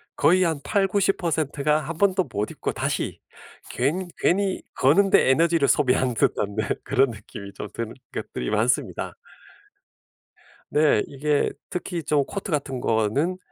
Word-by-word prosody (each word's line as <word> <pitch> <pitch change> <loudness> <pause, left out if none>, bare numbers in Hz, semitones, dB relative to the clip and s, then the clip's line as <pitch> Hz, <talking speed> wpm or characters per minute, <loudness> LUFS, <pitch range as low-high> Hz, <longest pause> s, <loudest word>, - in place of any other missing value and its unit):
거의 180 +6 +4
한 160 -5 0
80%-90% 180 -7 0
가 150 +1 +3
1 155 +2 -6
번도 190 0 +3
못 105 +1 -2
입고 - - -3
다시 - - -2 0.5
괜 165 +9 -1
괜히 195 +1 +1
거는 170 +10 +4
데 - - +4
에너지를 165 +1 +3
소비하는 130 -3 +2
듯한 105 -2 0
네 110 -2 -2 0.2
그런 135 -1 +3
느낌이 100 -2 -10
좀 - - -6
드는 115 -1 -4 0.2
것들이 60 - -4
많습니다. - - 0 1.6
네. 150 -7 +4
이게 145 +1 0 0.2
특히 180 -2 -4
좀 145 -1 +2
코트 200 +4 -6
같은 140 -4 -2
거는 120 - 0
150 Hz, 245 characters per minute, -24 LUFS, 130-180 Hz, 1.6 s, 거의